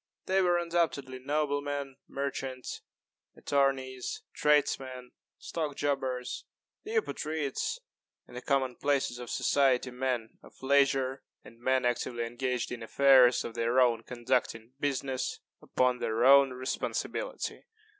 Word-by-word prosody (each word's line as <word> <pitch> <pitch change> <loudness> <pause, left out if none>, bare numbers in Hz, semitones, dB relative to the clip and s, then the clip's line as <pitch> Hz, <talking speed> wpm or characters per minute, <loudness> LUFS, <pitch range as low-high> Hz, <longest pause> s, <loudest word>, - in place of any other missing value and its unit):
They 190 +1 +2
were 175 -1 +3
undoubtedly 165 -6 -1
noblemen, 145 -1 -2
merchants, 135 -2 -4 0.6
attorneys, 135 -2 -1
tradesmen, 130 -4 +1 0.3
stock 155 -4 -4
jobbers 130 -3 -2 0.4
the 435 +2 -5
Eupatrids 160 - -1 0.5
and 125 - -15
the 125 - -5
common 130 -3 0
places 140 -4 0
of 120 -1 -7
society 130 -2 +2
men 125 -3 -3
of - - -17
leisure 135 -1 +2 0.2
and 115 - -15
men 130 +1 +1
actively 120 -1 -1
engaged 125 +1 -2
in 120 -1 -5
affairs 130 +1 +5
of 115 - -6
their 115 +2 +1
own 120 -3 +4
conducting 120 -1 -2
business 135 -2 -2 0.2
upon 125 -1 +1
their 110 +2 0
own 140 0 +8
responsibility. 130 - -4
130 Hz, 115 wpm, -30 LUFS, 125-140 Hz, 0.6 s, own